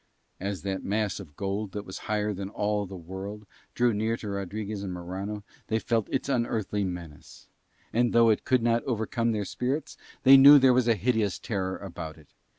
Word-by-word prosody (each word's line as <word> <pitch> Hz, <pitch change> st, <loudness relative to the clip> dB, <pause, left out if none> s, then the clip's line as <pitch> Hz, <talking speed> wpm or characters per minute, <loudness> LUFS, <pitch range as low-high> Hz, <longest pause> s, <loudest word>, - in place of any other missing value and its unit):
As 95 Hz, -2 st, -4 dB
that 95 Hz, -1 st, -3 dB
mass 105 Hz, 0 st, -1 dB
of 80 Hz, -7 st, -11 dB
gold 100 Hz, +2 st, -3 dB
that 105 Hz, 0 st, -5 dB
was 95 Hz, -, -7 dB
higher 105 Hz, 0 st, 0 dB
than 95 Hz, 0 st, -5 dB
all 105 Hz, -1 st, -1 dB
the 95 Hz, -, -8 dB
world 95 Hz, +5 st, -7 dB, 0.3 s
drew 120 Hz, -1 st, +3 dB
near 110 Hz, +2 st, 0 dB
to 105 Hz, -, -7 dB
Rodriguez 100 Hz, +1 st, -4 dB
and 100 Hz, -2 st, -4 dB
Morano 95 Hz, +4 st, -5 dB, 0.2 s
they 110 Hz, -, +1 dB
felt 115 Hz, -1 st, -1 dB
its -, -, -1 dB
unearthly 115 Hz, -6 st, -1 dB
menace; 90 Hz, -5 st, -8 dB, 0.5 s
and 120 Hz, +1 st, +2 dB
though 115 Hz, -1 st, +5 dB
it 105 Hz, -, 0 dB
could 130 Hz, -3 st, +2 dB
not 115 Hz, 0 st, +2 dB
overcome 115 Hz, 0 st, -1 dB
their 105 Hz, -2 st, -1 dB
spirits 130 Hz, +9 st, -3 dB, 0.3 s
they 135 Hz, +1 st, +9 dB
knew 140 Hz, +2 st, +10 dB
there 130 Hz, -2 st, +6 dB
was 125 Hz, -1 st, +2 dB
a 115 Hz, -, +4 dB
hideous 110 Hz, -1 st, 0 dB
terror 95 Hz, -4 st, -3 dB
about 85 Hz, -5 st, -7 dB
it. 75 Hz, -3 st, -20 dB
105 Hz, 190 wpm, -27 LUFS, 95-115 Hz, 0.5 s, knew